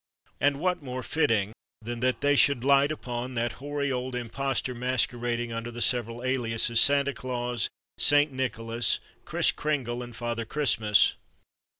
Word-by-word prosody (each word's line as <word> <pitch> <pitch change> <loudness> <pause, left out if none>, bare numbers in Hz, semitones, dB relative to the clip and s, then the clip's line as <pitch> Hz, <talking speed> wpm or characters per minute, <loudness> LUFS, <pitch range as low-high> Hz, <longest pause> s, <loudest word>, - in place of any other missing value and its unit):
And 140 0 +2
what 180 +1 0
more 130 -2 -5
fitting 110 -6 +1 0.3
than 120 +1 -5
that 130 -1 0
they 145 0 +3
should 140 -3 +4
light 140 +1 +4
upon 125 -3 -5
that 120 0 0
hoary 145 0 -2
old 125 0 -3
imposter 125 +2 -2
masquerading 120 -1 -1
under 115 +1 -4
the 120 0 -8
several 120 -1 0
aliases 115 -3 +1
Santa 140 0 +3
Claus, 125 -3 -2 0.3
Saint 145 0 +4
Nicholas, 120 -2 -1 0.3
Kris - - +2
Kringle, 130 -5 -2
and 120 -1 -8
Father 120 -1 -3
Christmas? 115 -5 +2
125 Hz, 140 wpm, -27 LUFS, 120-140 Hz, 0.3 s, should